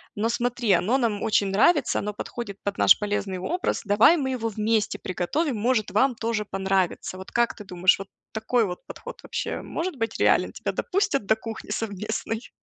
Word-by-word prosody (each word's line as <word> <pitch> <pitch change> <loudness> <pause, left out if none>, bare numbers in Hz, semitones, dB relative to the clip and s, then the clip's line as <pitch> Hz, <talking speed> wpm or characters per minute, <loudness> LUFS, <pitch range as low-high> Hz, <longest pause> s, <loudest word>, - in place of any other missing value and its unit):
но 220 +2 0
смотри, 240 -2 0
оно 205 +10 +1
нам 225 -6 0
очень 210 -2 +2
нравится, 255 - +3
оно 210 0 -3
подходит 205 -1 -6
под 200 0 -2
наш - - +6
полезный 205 -2 -2
образ. 350 - -1
Давай 210 +11 +6
мы 265 -4 -1
его 230 -3 -2
вместе 215 0 0
приготовим, 240 - -1
может, 215 -2 +1
вам 250 +6 +3
тоже 225 -1 -1
понравится". 190 -2 -1
Вот 190 - -10
как 235 0 +1
ты 210 - -10
думаешь, 180 0 +3
вот 195 0 -8 0.2
такой 225 +2 +1
вот 180 -2 -6
подход - - -9
вообще - - -3
может 345 -2 -4
быть 225 -1 -2
реален? - - +3
Тебя - - -3
допустят 385 - 0
до 220 - +4
кухни 225 0 -8
совместной? 220 +2 -3
220 Hz, 180 wpm, -25 LUFS, 200-245 Hz, 0.2 s, наш